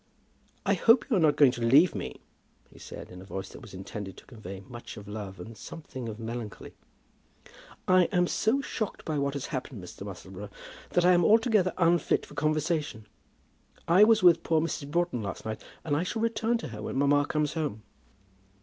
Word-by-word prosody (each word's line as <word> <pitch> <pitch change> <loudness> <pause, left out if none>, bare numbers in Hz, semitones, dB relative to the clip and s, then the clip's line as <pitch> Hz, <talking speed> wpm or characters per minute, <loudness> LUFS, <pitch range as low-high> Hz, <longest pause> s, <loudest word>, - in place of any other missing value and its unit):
"I - - +3
hope 230 +2 +5
you - - +4
are - - +3
not 155 -3 +4
going 140 -4 +6
to 120 - -7
leave 140 +10 +5
me?" 95 - -6 0.5
he - - -16
said, - - -9
in 90 0 -10
a - - -10
voice 95 0 -6
that - - -12
was 110 -7 -11
intended 95 +1 -7
to - - -14
convey 100 -6 -9
much 120 -2 -9
of 100 0 -10
love, 105 -2 -7
and 115 0 -9
something 130 -3 -8
of 110 +1 -7
melancholy. 115 -2 -6 1.1
"I 185 -1 +6
am 180 -1 +2
so 225 +9 +1
shocked 220 -5 -4
by 155 -3 -1
what 140 0 -1
has 140 - -3
happened, 125 -6 -5
Mr. 90 - -11
Musselboro, 100 0 -8 0.4
that 175 - +3
I 180 - +7
am 175 -1 +4
altogether 215 -2 +4
unfit 170 -1 +2
for - - -14
conversation. 150 -5 -1 0.8
I 180 +5 +7
was 220 -1 +5
with 175 -2 +7
poor 160 -1 +2
Mrs. 155 -2 -3
Broughton 170 -6 0
last 100 -4 -6
night, 110 0 -4 0.2
and 150 -3 0
I 150 - +1
shall 220 +5 -2
return 230 +1 +1
to 230 - -7
her 105 -2 -8
when - - -4
mamma 145 +1 +3
comes 150 -1 0
home." 145 -10 -3
145 Hz, 195 wpm, -28 LUFS, 110-175 Hz, 1.1 s, I